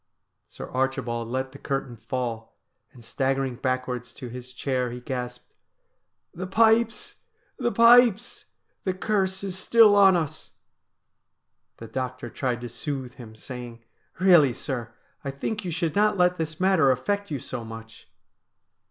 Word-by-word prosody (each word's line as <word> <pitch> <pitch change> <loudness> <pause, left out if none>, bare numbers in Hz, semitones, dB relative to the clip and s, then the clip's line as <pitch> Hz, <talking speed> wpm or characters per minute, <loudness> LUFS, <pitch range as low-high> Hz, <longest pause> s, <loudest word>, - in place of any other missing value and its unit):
Sir - - -9
Archibald 130 -3 -1
let 130 +2 -3
the 140 - -12
curtain 135 -3 -3
fall, 115 -2 -5 0.3
and, 120 -3 -15
staggering 135 +1 -1
backwards 125 -1 -3
to 125 -3 -8
his 125 +1 -9
chair, 130 0 -1
he 120 +1 -7
gasped: 125 -1 -6 0.4
' - - -53
The 185 - -3
pipes! 225 +3 +2 0.4
the 240 - 0
pipes! 235 -1 +5 0.4
The 185 -1 -1
curse 190 -1 -1
is 190 -2 -3
still 220 0 +6
on 195 -2 +7
us.' 155 -2 -3 1.2
The 115 - -9
doctor 125 0 -5
tried 125 -3 -2
to 120 - -5
soothe 130 0 -5
him, 115 -4 -12
saying: 120 0 -9 0.2
' - - -37
Eeally, 170 -9 +6
sir, 120 -5 -5 0.3
I 140 - -3
think 210 +10 -4
you 180 - -4
should 165 -2 -2
not 210 0 +3
let 180 0 +3
this 160 -1 -4
matter 185 -7 +4
affect 200 +11 0
you 145 - -2
so 125 -1 -6
much.' 115 0 -11
135 Hz, 150 wpm, -25 LUFS, 125-185 Hz, 1.2 s, on